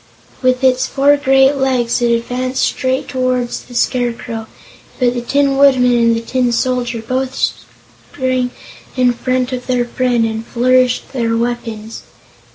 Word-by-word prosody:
With 255 0 +1
its 255 0 +3
four 285 +1 +3
great 270 0 +3
legs 255 -3 0
it 240 - +2
advanced 250 +2 -1
straight 260 0 -1
toward 255 -2 -1
the 245 - -8
Scarecrow, 235 -2 -2 0.5
but 245 -2 +2
the 245 - -3
Tin 275 +2 +1
Woodman 260 -3 +4
and 230 -1 +3
the 230 - -2
Tin 250 +1 0
Soldier 240 -1 -1
both 260 +1 -2 0.7
sprang 255 -2 -1 0.5
in 250 -1 +3
front 255 +1 -1
of 250 -1 -5
their 250 -1 +1
friend 240 -1 0
and 220 0 -3
flourished 250 +2 +1
their 230 -3 0
weapons. 230 -2 -4
250 Hz, 145 wpm, -16 LUFS, 240-260 Hz, 0.7 s, Woodman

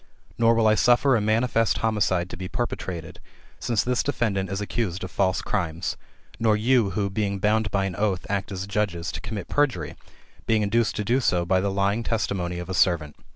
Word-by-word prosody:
Nor 115 0 +4
will 115 -1 +2
I 110 - +5
suffer 125 +5 +4
a 110 - +1
manifest 115 +1 +2
homicide 105 -5 +1
to - - -6
be 90 +1 -6
perpe 120 +3 -2
trated, 85 -3 -7 0.4
since 115 -4 0
this 125 0 +1
defendant 100 -9 -1
is 95 +1 -3
accused 105 -3 -2
of 95 - -6
false 95 -1 +1
crimes; 85 -5 -2 0.4
nor 110 -2 +3
you 115 -1 +3
who, 100 -2 +1
being 100 -1 -1
bound 105 +2 +1
by 100 -1 0
an 95 -3 -3
oath, 100 -2 -1
act 100 0 -2
as 95 -1 -4
judges, 100 -4 -2
to - - -6
commit 105 -1 -5
perjury, 130 - 0 0.5
being 110 -1 +3
induced 115 +2 +1
to 105 - -2
do 120 +6 +2
so 90 -9 +1
by 95 +1 +2
the 100 - 0
lying 100 +3 0
testimony 95 -6 -2
of 90 -1 -6
a 95 - -4
servant. 85 -5 +2
100 Hz, 200 wpm, -25 LUFS, 95-115 Hz, 0.5 s, I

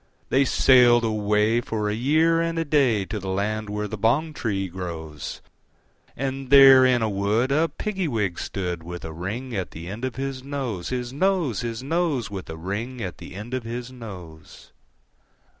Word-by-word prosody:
They 135 +1 +3
sailed 125 -3 +5
away, 105 +1 +2
for 110 -3 -2
a 105 - 0
year 155 +8 +3
and 165 0 -1
a 165 - 0
day, 130 -9 +2
To 105 +2 -4
the 95 -1 -6
land 105 +2 -2
where 105 0 -3
the 105 0 -6
bong 145 +9 +1
tree 100 -8 -2
grows; 85 -5 -6 0.8
And 135 0 -3
there 135 -1 +9
in 125 -2 +2
a - - +2
wood 105 +5 0
a 160 +4 +2
Piggy 195 -5 -3
wig 105 - -1
stood, 90 -4 -3
With 90 +1 -8
a 80 - -6
ring 110 +9 -5
at 95 -3 -2
the 85 +2 -9
end 105 +6 -7
of 130 -2 -2
his 135 0 -4
nose, 130 -11 -4
His 125 -1 -3
nose, 170 - +1
His 115 0 -4
nose, 150 -7 -1
With 95 -2 -6
a 80 - -6
ring 105 +9 -4
at 95 -5 -5
the - - -10
end 105 +5 -7
of 130 - -1
his 120 +2 -6
nose. 90 -10 -11
115 Hz, 185 wpm, -24 LUFS, 100-135 Hz, 0.8 s, there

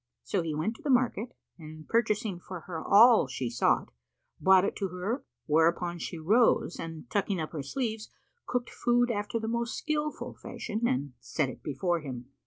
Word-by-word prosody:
So 195 - 0
he 160 -2 -3
went 210 +10 -1
to - - -17
the 300 - -3
market 245 -3 +1 0.2
and 155 -1 -10
purchasing 215 -4 +1
for 180 -1 -8
her 165 -1 -6
all 220 - +7
she 125 -2 -3
sought, 120 - +1 0.5
brought 190 0 +6
it - - -2
to 195 - -1
her, 185 - -3 0.2
whereupon 170 +2 +2
she 170 - -5
rose 205 +2 +3
and 165 -1 -7
tucking 200 -2 0
up 155 - -3
her 155 - -4
sleeves, 220 - -3 0.4
cooked 245 -1 -2
food 245 0 +2
after 205 +1 -2
the 220 - -4
most 235 +1 -2
skilful 300 0 -2
fashion, 225 +2 -3
and 140 - -1
set 135 +3 -1
it - - -10
before 170 +5 -1
him. 130 -3 -8
190 Hz, 180 wpm, -29 LUFS, 155-230 Hz, 0.5 s, all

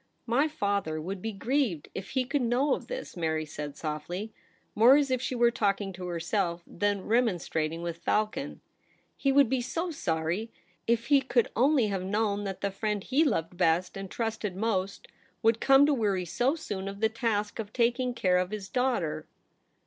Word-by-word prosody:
' - - -44
My 250 +6 +2
father 200 - -1
would 185 +4 -5
be 225 - -3
grieved 225 - -1
if 190 0 -6
he 255 - +2
could 280 +2 0
know 250 +4 +2
of - - -4
this,' - - -6
Mary 160 -2 -1
said 150 -1 -7
softly, 175 +7 -4 0.4
more 235 +5 +7
as 285 -2 +1
if 255 -1 +1
she 260 - -2
were 240 0 +4
talking 200 -3 0
to 180 0 -6
herself 175 0 -1
than 205 +1 -1
remonstrating 170 -8 0
with 170 -1 -4
Falcon. 215 +10 -1 0.3
' - - -38
He 275 - +1
would 280 -1 +5
be 260 +1 0
so 330 +8 -3
sorry. 170 - -2 0.4
If 235 0 +2
he 280 - +7
could 250 -3 +1
only 265 +1 +4
have 195 -2 -2
known 205 +1 0
that 195 -1 -5
the 200 - -1
friend 210 0 -2
he 275 +5 +2
loved 175 - -1
best 175 0 +2
and 195 -1 -6
trusted 220 -4 -3
most 200 -2 -2 0.4
would 225 0 +3
come 270 +1 +6
to 295 - +3
weary 200 -7 0
so 245 - +1
soon 200 -12 -5
of 200 0 -6
the 220 - +4
task 220 -2 -2
of 210 -2 -5
taking 245 +1 +1
care 180 -5 +2
of 180 0 -1
his 205 -2 -6
daughter 180 -11 -1
210 Hz, 190 wpm, -29 LUFS, 180-245 Hz, 0.4 s, more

